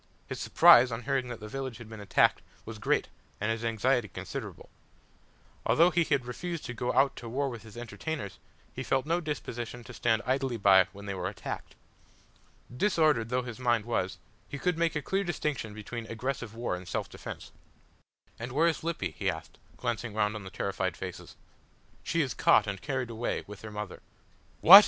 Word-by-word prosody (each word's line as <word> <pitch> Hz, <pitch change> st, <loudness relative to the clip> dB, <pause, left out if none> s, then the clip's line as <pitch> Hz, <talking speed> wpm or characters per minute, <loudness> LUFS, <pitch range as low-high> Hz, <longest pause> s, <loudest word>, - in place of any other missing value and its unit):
His -, -, -5 dB
surprise 125 Hz, +1 st, +7 dB
on 115 Hz, +1 st, -4 dB
hearing 130 Hz, +1 st, 0 dB
that 120 Hz, -2 st, -6 dB
the 105 Hz, -, -7 dB
village 130 Hz, 0 st, -4 dB
had 120 Hz, -, -10 dB
been 110 Hz, -1 st, -9 dB
attacked 100 Hz, -3 st, +3 dB, 0.2 s
was 110 Hz, -1 st, -7 dB
great -, -, +2 dB, 0.3 s
and 105 Hz, +2 st, 0 dB
his 115 Hz, +1 st, -2 dB
anxiety 115 Hz, +1 st, +2 dB
considerable. 85 Hz, -, -7 dB, 0.9 s
Although 170 Hz, +3 st, +5 dB
he 170 Hz, 0 st, +3 dB
had 140 Hz, -5 st, +1 dB
refused 170 Hz, +7 st, -4 dB
to 125 Hz, -, -4 dB
go 125 Hz, +1 st, -1 dB
out 135 Hz, 0 st, +4 dB
to 120 Hz, -, -7 dB
war 135 Hz, +4 st, 0 dB
with 120 Hz, -4 st, -7 dB
his 110 Hz, 0 st, -12 dB
entertainers, 120 Hz, -, -5 dB, 0.3 s
he -, -, -5 dB
felt 135 Hz, 0 st, +1 dB
no 170 Hz, +3 st, +1 dB
disposition 120 Hz, -6 st, -4 dB
to 120 Hz, -, -10 dB
stand 115 Hz, -1 st, +1 dB
idly 130 Hz, -1 st, 0 dB
by 95 Hz, -3 st, +7 dB
when 100 Hz, +1 st, -10 dB
they 100 Hz, -, -3 dB
were 90 Hz, -1 st, -2 dB
attacked. 100 Hz, -, -6 dB, 1.0 s
Disordered 155 Hz, -, +3 dB
though 125 Hz, +1 st, +1 dB
his 120 Hz, -1 st, -7 dB
mind 120 Hz, -4 st, +2 dB
was, 95 Hz, -6 st, -1 dB, 0.3 s
he 140 Hz, -, -4 dB
could 180 Hz, +4 st, +1 dB
make 165 Hz, 0 st, +1 dB
a 150 Hz, -, -1 dB
clear 195 Hz, +1 st, 0 dB
distinction 150 Hz, -, -2 dB
between 110 Hz, +2 st, -6 dB
aggressive 120 Hz, 0 st, -3 dB
war 115 Hz, -5 st, -1 dB
and 90 Hz, 0 st, -9 dB
self -, -, -2 dB
defence. -, -, -8 dB, 0.9 s
"And 120 Hz, +2 st, -5 dB
where 155 Hz, +4 st, +4 dB
is 165 Hz, -, 0 dB
Lippy?" 170 Hz, 0 st, -1 dB
he -, -, -1 dB
asked, -, -, -6 dB, 0.2 s
glancing 120 Hz, -2 st, -2 dB
round 105 Hz, -1 st, +2 dB
on 105 Hz, -, -6 dB
the 95 Hz, -, -7 dB
terrified 95 Hz, -1 st, -2 dB
faces. 95 Hz, -1 st, -7 dB, 0.7 s
"She 165 Hz, -, +1 dB
is 135 Hz, -, -2 dB
caught 105 Hz, -, +5 dB
and 100 Hz, -3 st, -4 dB
carried 130 Hz, -4 st, -2 dB
away 115 Hz, +1 st, -2 dB
with 105 Hz, -, -10 dB
her 110 Hz, -, -7 dB
mother." 105 Hz, -2 st, -6 dB, 0.6 s
"What!" 195 Hz, +5 st, +13 dB
120 Hz, 190 wpm, -30 LUFS, 105-135 Hz, 1.0 s, What